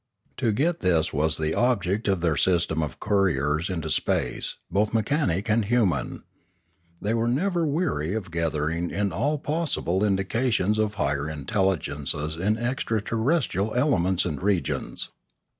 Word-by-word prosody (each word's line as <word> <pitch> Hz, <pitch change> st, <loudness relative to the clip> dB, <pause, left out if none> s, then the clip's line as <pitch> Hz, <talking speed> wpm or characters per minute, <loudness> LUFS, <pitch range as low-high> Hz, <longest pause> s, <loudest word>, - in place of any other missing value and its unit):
To 120 Hz, -4 st, +1 dB
get 160 Hz, +10 st, +1 dB
this 85 Hz, -4 st, +1 dB
was 75 Hz, +2 st, +1 dB
the 80 Hz, 0 st, -1 dB
object 110 Hz, -4 st, +1 dB
of 95 Hz, -3 st, +1 dB
their 85 Hz, -3 st, +2 dB
system 85 Hz, -1 st, +2 dB
of 75 Hz, -4 st, -4 dB
couriers 85 Hz, -5 st, +1 dB
into 85 Hz, -4 st, -3 dB
space, -, -, -1 dB, 0.2 s
both 105 Hz, +3 st, +1 dB
mechanic 110 Hz, -, +1 dB
and 110 Hz, +1 st, +3 dB
human. 110 Hz, -4 st, 0 dB, 0.8 s
They 105 Hz, -, -1 dB
were 115 Hz, 0 st, +1 dB
never 170 Hz, +6 st, +1 dB
weary 140 Hz, -, -1 dB
of 100 Hz, -6 st, -4 dB
gathering 80 Hz, +1 st, -1 dB
in 100 Hz, +1 st, -1 dB
all 140 Hz, -, 0 dB
possible 145 Hz, -, -1 dB
indications 105 Hz, +1 st, +1 dB
of 105 Hz, -1 st, 0 dB
higher 70 Hz, +2 st, -1 dB
intelligences 75 Hz, -2 st, -1 dB
in 100 Hz, +6 st, 0 dB
extra 120 Hz, -2 st, -1 dB
terrestrial 110 Hz, -, 0 dB
elements 95 Hz, -, +2 dB
and 75 Hz, -, -3 dB
regions. 95 Hz, -2 st, -1 dB
100 Hz, 140 wpm, -25 LUFS, 85-115 Hz, 0.8 s, and